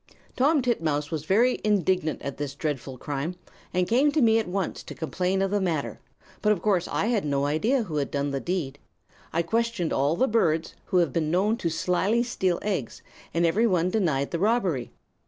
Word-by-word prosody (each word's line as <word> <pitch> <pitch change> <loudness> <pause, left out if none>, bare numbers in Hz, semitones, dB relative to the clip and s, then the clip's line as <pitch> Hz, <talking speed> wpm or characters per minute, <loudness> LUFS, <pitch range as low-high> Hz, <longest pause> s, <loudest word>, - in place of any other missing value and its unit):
"Tom 285 +2 +3
Titmouse 155 - 0
was 155 -2 -3
very 235 +8 +3
indignant 185 -6 +1
at 140 -1 -5
this 145 -1 -4
dreadful 140 -4 -4
crime, 145 +6 -3 0.4
and 180 0 +1
came 265 +6 +3
to 310 - +1
me 225 -1 +5
at 220 - -3
once 185 0 -2
to - - -9
complain 185 +4 -1
of 195 - -1
the 205 -1 +1
matter; 165 -6 -2 0.4
but 210 - +3
of 210 - +1
course 185 -2 +1
I - - -1
had 225 -3 +1
no 140 -1 0
idea 220 - +1
who 160 -7 -4
had 140 - -1
done 140 0 -1
the 135 - -1
deed. 145 -5 -3 0.5
I 170 +1 +1
questioned 225 -3 0
all 140 +4 +2
the 260 - +2
birds 165 -9 +1
who 185 - 0
have 170 -3 +3
ever - - -14
been 155 -2 0
known 195 +6 +2
to 170 - -1
slyly 185 +8 +1
steal 190 -7 0
eggs, 190 - -3 0.3
and 170 +1 +1
every 210 +8 +3
one 180 -3 +1
denied 155 -10 0
the 170 - -2
robbery. 190 - +1
180 Hz, 205 wpm, -26 LUFS, 150-215 Hz, 0.5 s, me